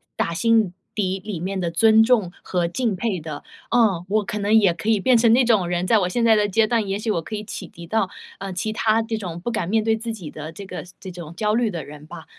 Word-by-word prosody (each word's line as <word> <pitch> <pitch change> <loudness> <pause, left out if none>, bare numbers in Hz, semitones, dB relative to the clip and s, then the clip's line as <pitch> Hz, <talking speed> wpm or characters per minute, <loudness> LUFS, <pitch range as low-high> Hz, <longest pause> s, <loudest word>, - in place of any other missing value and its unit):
打 170 - -1
心 220 0 +2 0.2
底 195 -2 -1
里 195 -2 -6
面 190 +3 -3
的 175 -2 -1
尊 220 +5 +5
重 225 -7 +2
和 175 -2 0
敬 215 +4 -1
佩 195 -1 -2
的， 155 -2 -7 0.3
嗯， 210 -8 +3
我 215 +1 +2
可 210 0 -3
能 205 +1 0
也 205 -5 +5
可 210 - -4
以 220 -3 +3
变 250 +4 +4
成 230 0 +4
那 255 +2 +5
种 215 -7 +3
人， 175 0 -1
在 225 -2 +4
我 180 - 0
现 235 +6 0
在 225 -1 +6
的 210 -1 +2
阶 220 +3 +3
段， 230 -2 +1
也 195 - -1
许 220 - -3
我 170 - 0
可 215 +7 -6
以 210 - -5
启 200 -3 -7
迪 170 - -12
到， 215 -1 0 0.3
呃， 195 -1 -5
其 190 +5 -2
他 220 +1 +2
这 225 0 -3
种 175 -5 -6
不 215 +7 -3
敢 195 -7 -2
面 220 +1 +2
对 220 0 +2
自 230 0 -4
己 180 -8 -8
的 155 +1 -7
这 195 +4 -9
个 180 -1 -7 0.2
这 190 - -8
种 170 -2 -9
焦 210 +2 0
虑 235 -1 +2
的 170 -4 -5
人 150 +1 -11
吧， 165 -1 -10
205 Hz, 290 characters per minute, -22 LUFS, 175-225 Hz, 0.3 s, 在